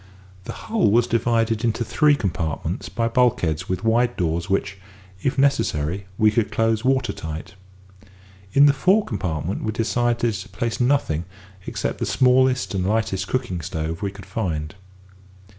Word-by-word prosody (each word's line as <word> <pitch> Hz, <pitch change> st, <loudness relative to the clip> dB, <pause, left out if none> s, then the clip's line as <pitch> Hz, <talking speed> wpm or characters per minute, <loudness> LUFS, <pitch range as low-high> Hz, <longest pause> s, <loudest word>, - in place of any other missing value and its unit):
The -, -, -5 dB
hull 220 Hz, -, 0 dB
was 115 Hz, +3 st, +4 dB
divided 115 Hz, -1 st, +1 dB
into 115 Hz, 0 st, 0 dB
three 150 Hz, +3 st, +3 dB
compartments 85 Hz, -, -3 dB
by 115 Hz, +2 st, -1 dB
bulkheads 115 Hz, -, +1 dB
with 95 Hz, -1 st, -2 dB
wide 115 Hz, +2 st, +2 dB
doors 85 Hz, 0 st, -1 dB
which, 95 Hz, 0 st, -1 dB, 0.4 s
if 135 Hz, -, -1 dB
necessary, 100 Hz, -, +1 dB
we 110 Hz, 0 st, +4 dB
could 110 Hz, -1 st, 0 dB
close 115 Hz, -1 st, +1 dB
water 130 Hz, -1 st, +1 dB
tight. 80 Hz, +4 st, -7 dB, 1.0 s
In 140 Hz, -, +7 dB
the 145 Hz, -, +6 dB
fore 190 Hz, +8 st, +3 dB
compartment 90 Hz, -4 st, -3 dB
we 110 Hz, -, -1 dB
decided 120 Hz, +1 st, 0 dB
to 95 Hz, -1 st, -7 dB
place 120 Hz, -1 st, -3 dB
nothing 120 Hz, -, +1 dB, 0.4 s
except -, -, -3 dB
the -, -, -1 dB
smallest 130 Hz, -1 st, +3 dB
and 95 Hz, -2 st, -1 dB
lightest 95 Hz, -2 st, 0 dB
cooking 120 Hz, -9 st, -2 dB
stove 80 Hz, +2 st, -4 dB
we 100 Hz, -, -1 dB
could 100 Hz, 0 st, -11 dB
find. 80 Hz, -8 st, -3 dB
110 Hz, 150 wpm, -22 LUFS, 90-125 Hz, 1.0 s, In